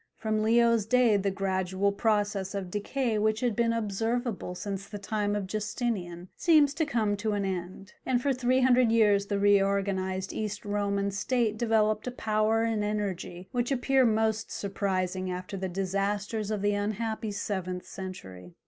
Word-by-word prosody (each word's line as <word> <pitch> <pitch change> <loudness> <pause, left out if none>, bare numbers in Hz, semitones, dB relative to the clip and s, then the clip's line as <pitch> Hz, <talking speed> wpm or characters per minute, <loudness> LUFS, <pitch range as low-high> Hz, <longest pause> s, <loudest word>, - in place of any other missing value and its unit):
From 215 -1 -1
Leo's 230 -1 +3
day 245 -2 +4
the 200 0 +1
gradual 190 0 0
process 205 -2 0
of 190 -3 -4
decay 220 +2 -1
which 215 +1 +1
had 245 -4 +1
been 235 -1 +2
observable 225 -2 -2
since 195 +1 -5
the 205 - -7
time 205 0 -1
of 205 -2 -2
Justinian 200 -4 -3
seems 305 -5 +4
to 320 0 -1
come 220 -7 +1
to 215 +1 -1
an 200 -1 -1
end, 190 +1 -5
and 255 -2 +1
for 275 +2 +1
three 255 +1 +2
hundred 250 -2 +4
years 205 -3 +4
the 200 - -1
reorganized 195 -1 +1
East 210 -1 -4
Roman 200 -1 0
state 225 +2 0
developed 215 -1 +1
a - - -1
power 220 -1 +1
and 225 -2 0
energy 195 -4 -3
which 245 +1 -1
appear 270 0 +3
most 220 -1 +1
surprising 185 -2 -2
after 180 +2 -5
the 190 -1 -3
disasters 200 +3 -2
of 210 -2 -2
the 205 0 +2
unhappy 215 +2 -2
seventh 185 -3 -3
century. 95 - -9
205 Hz, 160 wpm, -28 LUFS, 195-225 Hz, -, day